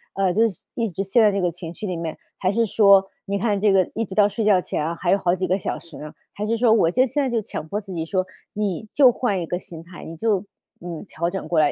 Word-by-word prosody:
“呃， 195 -2 +2
就 225 +4 +4
是 185 - -13
一 230 -2 -1
直 185 +1 -4
陷 200 +5 +3
在 210 - +5
这 200 - -1
个 180 - +2
情 170 0 -8
绪 205 +4 -6
里 180 - -2
面？ 165 -2 -4 0.2
还 185 - +1
是 230 +2 +2
说 200 -2 +5 0.2
你 200 0 -1
看 205 -1 +1
这 210 -1 +4
个 190 -1 +3
一 225 - 0
直 195 - -9
到 205 -1 +5
睡 210 +2 -3
觉 205 -3 +5
前 155 - -3
啊， 165 +2 -2
还 175 +1 -1
有 195 - +5
好 175 -3 +1
几 185 0 -2
个 185 +2 +2
小 - - -3
时 165 -3 -13
呢， 150 0 -8 0.2
还 210 - -4
是 230 +2 0
说 235 -1 +3
我 170 -7 +3
就 255 +6 +3
现 290 +3 -1
在 265 - 0
就 235 -2 +1
强 155 -6 -6
迫 205 +6 -2
自 195 -3 -9
己 160 -1 -3
说： 185 +2 -1 0.3
“你 210 0 -2
就 265 -4 +6
换 210 -6 -1
一 - - -3
个 175 - -2
心 165 -3 -11
态， 170 +1 -12
你 165 - -8
就 210 +1 0 0.4
嗯， 170 -3 -6
调 170 +2 -2
整 190 +1 -5
过 165 -3 +2
来， 150 -1 +4
195 Hz, 320 characters per minute, -23 LUFS, 175-215 Hz, 0.4 s, 就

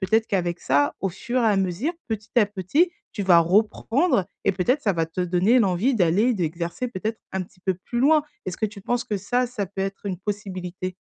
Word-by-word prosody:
Peut-être 220 +3 +2
qu'avec 175 -4 -1
ça 145 +2 +2
au 195 - 0
fur 240 +7 -2
et - - +2
à 210 - +3
mesure, 195 - 0 0.2
petit 220 0 -4
à 215 -4 +6
petit, 205 - +1 0.2
tu 205 - -3
vas 180 -3 +6
reprendre 215 - +2 0.2
et 200 - +3
peut-être, 240 +10 +1
ça 200 - +2
va 165 -2 0
te 165 +3 -5
donner 180 +7 +3
l'envie 205 +4 +2
d'aller 205 +5 +3
d'exercer 170 - -2
peut-être 220 0 -4
un 190 0 -1
petit 180 0 -16
peu 190 0 0
plus 235 +6 -5
loin? 300 +3 +5 0.2
Est-ce 185 - -4
que 220 - 0
tu 205 -1 -10
penses 240 +4 -1
que 210 - -2
ça, 245 +6 0
ça 235 -5 -4
peut 195 +1 -7
être 195 +1 -4
une 185 -3 -3
possibilité? 185 -2 -5
200 Hz, 215 wpm, -24 LUFS, 180-230 Hz, 0.2 s, à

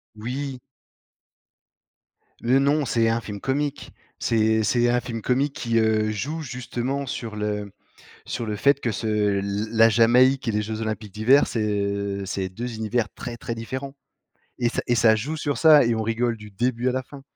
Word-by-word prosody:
Oui. 130 +4 -5 1.8
Le 125 +3 +3
non, 145 +2 +2
c'est 115 -2 +2
un 115 +1 +1
film 105 -2 -7
comique. 145 +1 -2 0.3
C'est 110 -1 +2
c'est 120 +3 +2
un 120 0 +3
film 115 -2 -5
comique 135 +5 0
qui 115 -4 -1
heu, 110 -1 +2
joue 145 +10 -3
justement 125 0 -3
sur 115 -4 -5
le 105 -1 -3 0.5
sur 120 - -4
le 105 -1 -3
fait 140 +7 +3
que 120 - -1
ce 105 -2 0
l 100 +2 -2
la 115 0 +6
Jamaïque 125 +4 +4
et - - +2
les 105 0 0
jeux 110 +1 -4
olympiques 110 -2 -4
d'hiver 125 +7 +4
c'est 115 - -2
heu, 100 -1 -2
c'est 95 0 -3
deux 115 +5 -6
univers 110 +1 -1
très, 120 -1 -7
très 115 - -5
différents 130 +4 -6 0.6
et 120 - +2
ça - - -2
et 120 - +2
ça 110 -1 +5
joue 140 +9 -3
sur 145 -2 -2
ça 155 -3 +7
et 115 0 +2
on 110 - -1
rigole 115 +1 0
du 105 -1 -12
début 120 +4 -1
à - - +1
la 130 +1 -1
fin. 140 +1 -13
115 Hz, 185 wpm, -24 LUFS, 110-130 Hz, 1.8 s, ça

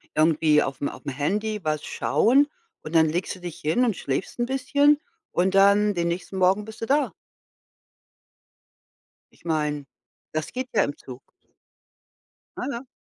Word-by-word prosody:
irgendwie 155 -1 +4
auf'm 140 +1 -3
auf'm 140 - -7
Handy 210 +10 -1
was 155 -1 -1
schauen 275 +6 +3 0.3
und 155 +2 -7
dann 160 -1 +6
legst 175 +4 -2
du - - -13
dich 175 -2 -7
hin 200 +12 +2
und 220 -6 0
schläfst 140 - -3
'n 240 - +2
bisschen 285 +3 +3 0.3
und 185 +2 +1
dann 200 +1 +5
den 170 -2 -1
nächsten 185 +2 -4
Morgen 190 +3 +3
bist 220 +1 -11
du - - -1
da. 285 +3 +1 2.3
Ich - - -4
meine, 150 -3 -1 0.5
das 155 -1 -2
geht 255 0 -4
ja 205 - +4
im 145 - -2
Zug. 130 0 -12 1.3
Aha. 255 -1 -4
185 Hz, 150 wpm, -25 LUFS, 155-225 Hz, 2.3 s, dann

